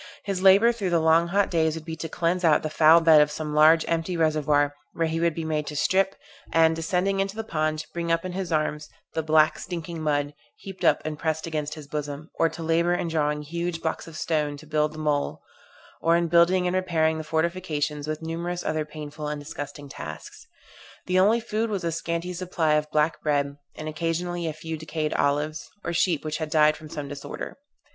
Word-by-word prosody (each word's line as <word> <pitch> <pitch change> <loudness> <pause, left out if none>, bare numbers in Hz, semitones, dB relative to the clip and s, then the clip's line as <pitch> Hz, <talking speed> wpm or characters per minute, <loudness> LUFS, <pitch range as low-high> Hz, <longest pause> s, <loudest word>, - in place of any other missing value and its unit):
His 195 -2 -2
labor 195 +5 +7
through 210 -6 -3
the 170 -1 +3
long 160 +1 +4
hot 200 +3 +1
days 160 -2 +2
would 160 -1 -8
be 160 -1 -5
to 165 +1 -5
cleanse 175 +2 0
out 155 -3 +4
the 155 - -3
foul 160 +2 +6
bed 160 -2 +7
of 150 - +3
some 150 0 -4
large 155 +2 +6
empty 165 +2 -1
reservoir, 150 -2 +2 0.2
where 165 - 0
he 160 0 -1
would 170 -1 +1
be 165 - -3
made 155 -1 -1
to 150 - -5
strip, 190 +5 +2 0.4
and 160 0 +4
descending 180 +4 0
into 195 +1 -1
the 225 - -3
pond, 155 -5 -1
bring 170 -1 -2
up 165 +1 +1
in 185 - -3
his 185 -1 -4
arms 155 -1 -1 0.2
the 160 - 0
black 155 0 +3
stinking 170 -2 -5
mud, 145 -1 0 0.2
heaped 195 -1 -10
up - - +3
and 155 -1 -4
pressed 160 -1 -1
against 150 -2 -3
his 155 -2 -9
bosom; 150 +1 -5
or 165 - +2
to 165 - -8
labor 170 +2 +2
in 175 - -2
drawing 150 -2 0
huge 170 +2 -3
blocks 160 - -2
of 160 -1 -9
stone 150 -3 -1
to 150 - -13
build 150 0 0
the - - -10
mole; 150 -2 -1 0.6
or 165 +1 +4
in 170 0 +1
building 170 +2 +4
and 180 +1 0
repairing 160 -4 +1
the - - -4
fortifications, 155 -2 -1
with 155 +1 -4
numerous 170 +2 -4
other 155 0 -1
painful 150 0 -7
and 150 0 -3
disgusting 145 0 -7
tasks. 80 - -9 0.6
The 185 0 +2
only 210 +5 +4
food 225 0 -2
was 200 -4 -2
a 170 - 0
scanty 170 +2 -3
supply 175 -3 0
of 150 0 +1
black 155 +1 +1
bread, 145 -1 0 0.2
and 155 - -6
occasionally 170 +2 -2
a 155 - -2
few 160 +1 -6
decayed 155 -1 -3
olives, 150 +2 0
or 170 - -3
sheep 165 -2 +1
which 155 0 -2
had 155 -1 -3
died 155 -1 +4
from 155 0 -11
some 150 -3 -5
disorder. 140 - -7
160 Hz, 215 wpm, -25 LUFS, 150-170 Hz, 0.6 s, labor